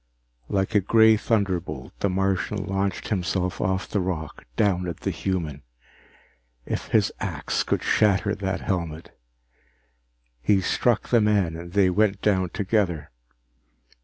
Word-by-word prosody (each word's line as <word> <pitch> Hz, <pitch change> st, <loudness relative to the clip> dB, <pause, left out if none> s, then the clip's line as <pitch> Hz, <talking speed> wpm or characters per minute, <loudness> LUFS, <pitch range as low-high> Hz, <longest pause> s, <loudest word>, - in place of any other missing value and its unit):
Like 95 Hz, +2 st, 0 dB
a 105 Hz, -, +5 dB
gray 110 Hz, +3 st, +5 dB
thunderbolt, 95 Hz, -, -1 dB
the 100 Hz, -, +1 dB
Martian 95 Hz, +1 st, -1 dB
launched 95 Hz, -1 st, -2 dB
himself 90 Hz, -2 st, -1 dB
off 95 Hz, 0 st, 0 dB
the 105 Hz, -, -1 dB
rock, 85 Hz, -5 st, -4 dB
down 90 Hz, -4 st, +1 dB
at 85 Hz, -, -6 dB
the -, -, -1 dB
human. 80 Hz, -7 st, -3 dB, 1.0 s
If -, -, -3 dB
his -, -, +2 dB
axe -, -, -2 dB
could -, -, -1 dB
shatter 100 Hz, -1 st, +2 dB
that 95 Hz, -2 st, -3 dB
helmet 85 Hz, -4 st, -4 dB, 1.3 s
He 95 Hz, +10 st, +3 dB
struck 115 Hz, +4 st, +1 dB
the 120 Hz, -2 st, +4 dB
man 100 Hz, -6 st, +2 dB
and 85 Hz, +1 st, -9 dB
they 95 Hz, -2 st, +4 dB
went 100 Hz, +1 st, +2 dB
down 95 Hz, -4 st, +1 dB
together. 95 Hz, -6 st, -1 dB
95 Hz, 135 wpm, -25 LUFS, 90-105 Hz, 1.3 s, a